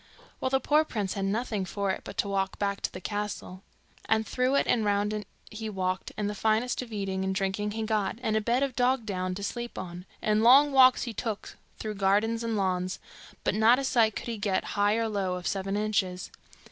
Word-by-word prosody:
Well, 260 - 0
the 265 0 +2
poor 300 +4 +3
prince 210 -10 -3
had 195 -1 -2
nothing 215 0 -1
for 200 +1 -1
it - - -4
but - - -9
to - - +1
walk 195 -1 -1
back 200 -1 -1
to - - -2
the - - -7
castle; 205 -2 -4 0.4
and 220 0 +2
through 255 +4 +1
it - - +3
and 230 - +2
round 205 0 +1
it 210 -2 -4 0.2
he 220 0 -5
walked, 185 -2 -2
and 210 -1 -1
the 205 - -2
finest 220 +4 +1
of 245 -2 -9
eating 195 -2 -2
and 190 0 -1
drinking 195 +1 -1
he 225 0 -2
got, 215 -2 0
and 220 -2 +1
a 220 - +2
bed 240 +5 +1
of 270 -3 -2
bog 250 -1 +2
down 185 -3 -2
to 200 - -6
sleep 240 +3 -4
on, 180 0 -7
and 215 0 +2
long 275 +5 +7
walks 260 -2 +6
he 235 - -4
took 215 -1 -4 0.2
through 215 -1 -4
gardens 215 +4 +2
and 230 -2 -1
lawns, 185 -1 0 0.5
but - - +1
not 220 +4 +5
a 275 - -2
sight 230 -5 +3
could - - -5
he 230 -2 -4
get, 200 -2 0
high 205 +1 +3
or 230 0 0
low, 195 -4 -1
of 180 -1 -7
Seven 195 +1 -1
Inches. 200 -4 -1
210 Hz, 225 wpm, -28 LUFS, 195-230 Hz, 0.5 s, long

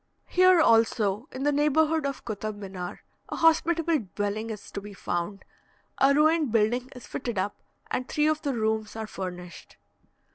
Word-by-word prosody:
Here 370 -1 +5
also, 225 -5 +3
in 260 - -5
the 290 - +3
neighbourhood 300 +1 +2
of 275 - -6
Kotab 215 -1 -4
Minar, 190 -3 -7 0.3
a - - -4
hospitable 330 0 +3 0.2
dwelling 210 +2 -2
is 210 -2 -8
to 200 - -5
be 205 0 -10
found. 185 +2 -3 0.5
A 270 +1 +5
ruined 305 -1 +3
building 235 +3 +1
is 250 - -10
fitted 240 -4 -4
up, 200 +2 -1 0.4
and 255 - -2
three 300 - +1
of 310 0 +1
the 280 -4 -1
rooms 220 -1 -1
are 220 0 -4
furnished. 180 -4 -8
230 Hz, 160 wpm, -27 LUFS, 205-300 Hz, 0.5 s, Here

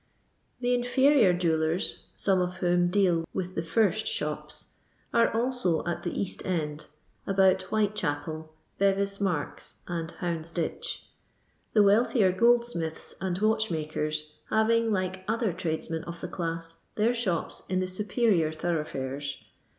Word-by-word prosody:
The 245 0 +2
inferior 245 -2 +4
jewellers 165 -1 0
(some 190 -2 +2
of 180 0 -1
whom 175 0 +3
deal 180 -3 +3
with 185 -1 -2
the 165 - -1
first 215 +4 +1
shops) - - -3 0.4
are 230 0 +4
also 235 -8 +1
at 170 -1 -2
the 175 - -3
East 195 - -3
end, 155 -5 -2 0.4
about 190 -1 +4
'Whitechnpel, 160 -7 -1 0.3
Bevis 200 0 +2
nmrks, 180 -7 -2
and 165 -2 -3
Houndsditch; 170 - -3 0.7
the 210 - +6
wealthier 205 -1 +4
goldsmiths 235 -6 +1
and 185 -2 -1
watchmakers 155 -8 0 0.2
having, 230 +1 +3
like 185 -1 -1
other 225 -3 0
tradesmen 165 -2 -3
of 170 0 -7
the - - -4
class, 165 -1 -4 0.2
their 220 +3 +3
shops 195 -9 -1
in 185 0 +1
the 185 - 0
superior 195 -3 +1
thoroughfares. 145 -4 -3
185 Hz, 125 wpm, -28 LUFS, 165-215 Hz, 0.7 s, the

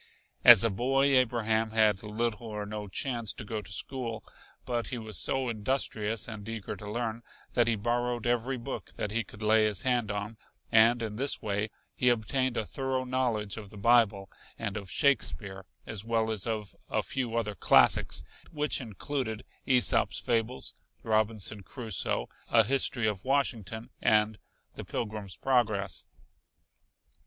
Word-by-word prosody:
As 120 -5 +10
a 115 - +2
boy 135 +7 +2
Abraham 115 -3 +2
had 110 -3 +3
little 110 +1 -3
or 105 -1 -4
no 105 0 -6
chance 115 +2 -1
to - - -7
go 110 0 -4
to 100 - -10
school, 120 +1 -3 0.4
but 120 -1 -1
he 125 - -3
was 110 -2 -7
so 135 -1 +1
industrious 110 -1 -1
and 110 -1 -7
eager 115 -3 -5
to 105 -2 -9
learn 115 0 -3 0.3
that 120 -1 +3
he 115 - +2
borrowed 120 +2 -1
every 120 +2 0
book 115 - -7
that 105 - -3
he 115 +2 0
could 105 +1 -12
lay 110 +1 +4
his 105 -3 0
hand 125 -4 +1
on, 105 +2 -4 0.3
and 115 +1 +5
in 105 -1 -4
this 135 +3 +2
way 105 +1 -1 0.2
he 125 - +2
obtained 120 +2 0
a 110 - 0
thorough 130 +1 -2
knowledge 120 -6 -1
of 105 -3 -8
the 105 - -11
bible 105 -3 +3 0.3
and 105 -3 -4
of 100 -3 -6
Shakespeare 95 - 0 0.2
as 105 -3 -4
well 115 -1 0
as 110 0 -1
of 110 -3 -3
a - - 0
few 125 -4 -3
other 110 -3 -1
classics, - - +4 0.3
which 150 -2 0
included 115 0 -4 0.2
Æsop's 125 -2 +3
fables, 120 0 0 0.3
Robinson 110 -1 0
Crusoe, 110 0 -3 0.2
a 115 -1 +6
history 125 0 +2
of 105 -3 -1
Washington 115 -6 -1
and 105 0 +3 0.3
the - - -7
Pilgrim's 105 -4 -5
Progress. 110 -9 0
110 Hz, 155 wpm, -29 LUFS, 105-120 Hz, 0.4 s, As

